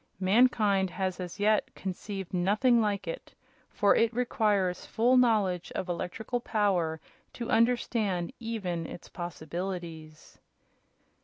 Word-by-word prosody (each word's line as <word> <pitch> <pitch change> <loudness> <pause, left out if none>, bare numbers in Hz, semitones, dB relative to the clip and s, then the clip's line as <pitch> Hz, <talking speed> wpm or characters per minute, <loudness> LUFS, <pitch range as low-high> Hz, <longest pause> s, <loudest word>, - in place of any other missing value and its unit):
Mankind 200 -1 +3
has 185 0 -3
as 180 +2 -6
yet 215 +1 +2
conceived 195 0 -6
nothing 215 +7 +3
like 205 -2 -1
it, - - -7 0.3
for 205 -2 +3
it 230 0 +3
requires 205 -7 +1
full 240 +3 +2
knowledge 210 -8 +2
of 185 - -3
electrical 185 +7 -3
power 190 -9 0 0.3
to 235 - -5
understand 225 -5 +1
even 195 -8 -3
its - - -10
possibilities." 170 -1 -6
200 Hz, 110 wpm, -29 LUFS, 180-225 Hz, 0.3 s, Mankind